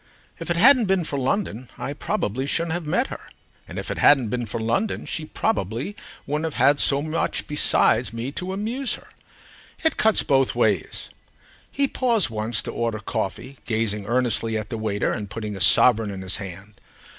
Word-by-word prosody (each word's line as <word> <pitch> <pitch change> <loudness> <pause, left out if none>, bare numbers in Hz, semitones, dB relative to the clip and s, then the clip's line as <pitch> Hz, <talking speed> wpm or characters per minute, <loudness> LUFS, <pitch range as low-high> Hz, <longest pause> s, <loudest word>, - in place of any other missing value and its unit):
If - - -7
it 170 - 0
hadn't 250 +4 +6
been 190 -2 +1
for 145 -3 -3
London 130 - -2
I 140 - -4
probably 135 - -2
shouldn't 165 +2 0
have 175 -2 -4
met 210 - +1
her, - - -7 0.5
and - - -9
if - - -4
it - - -4
hadn't 135 -6 +5
been 120 0 -3
for 110 +3 -4
London 115 - -1
she 155 -1 -4
probably 115 - -2 0.3
wouldn't 150 +3 -2
have - - -12
had 140 0 +4
so 140 0 +4
much 155 +1 -1
besides 120 -6 +3
me 115 +4 -5
to 180 +5 -4
amuse 230 +7 -1
her. - - -16 0.7
It 320 -2 +2
cuts 220 -1 +4
both 135 -3 +2
ways." 105 -7 -1 0.6
He 280 0 +1
paused 235 - +1
once 110 +1 -1
to - - -5
order 115 -2 -2
coffee, 120 +6 -5
gazing 110 -3 -1
earnestly 115 -2 0
at 110 -1 -5
the 115 - -3
waiter 105 -2 -1
and 105 -3 -4
putting 105 -1 -5
a 95 - -6
sovereign 110 +1 +6
in 95 -1 -6
his 95 +1 -2
hand. 100 +1 -9
125 Hz, 185 wpm, -23 LUFS, 110-170 Hz, 0.7 s, hadn't